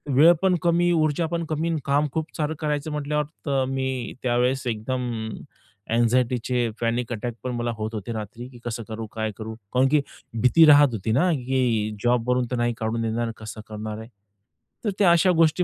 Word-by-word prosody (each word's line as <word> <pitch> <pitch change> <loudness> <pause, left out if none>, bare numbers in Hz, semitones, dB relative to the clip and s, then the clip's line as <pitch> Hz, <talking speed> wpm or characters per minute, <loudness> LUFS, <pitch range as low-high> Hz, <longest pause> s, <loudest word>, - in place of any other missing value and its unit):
वेळ 160 +5 +8
पण 190 -2 +3
कमी, 175 0 +3
ऊर्जा 155 0 +2
पण 170 0 -1
कमी 160 +2 -1
आणि 160 -2 0
काम 145 +2 +2
खूप 160 +1 -4
सारं 155 0 -1
करायचं 150 0 -2
म्हटल्यावर. 150 0 -1 0.2
तर 135 -2 +1
मी 130 -2 -2
त्यावेळेस 125 +2 +1
एकदम 120 +3 -2 0.8
अँग्झायटीचे 120 0 +1
पॅनिक 120 +1 -1
अटॅक 120 +2 -4
पण 125 - -2
मला 120 0 -1
होत 110 +1 -4
होते 110 +2 -5
रात्री, 110 +3 -6
की 125 - -14
कसं 115 -1 -3
करू, 110 0 -5
काय 110 -1 -2
करू 110 0 -6 0.2
कारण 130 +1 +4
की 150 -2 +4 0.4
भीती 160 +6 +6
राहत 145 -1 +8
होती 110 +1 -2
ना, 175 +10 +3
की 125 -5 0
जॉबवरून 125 +1 +2
तर - - 0
नाही 120 0 +1
काढून 115 +1 -2
देणार, 115 +1 -1
कसं 110 -1 -8
करणार 110 0 -5
आहे. 110 +2 -10 0.8
तर - - +2
त्या 180 -4 +6
अशा 175 +2 +5
गोष्टी 165 +2 +4
125 Hz, 185 wpm, -24 LUFS, 115-150 Hz, 0.8 s, वेळ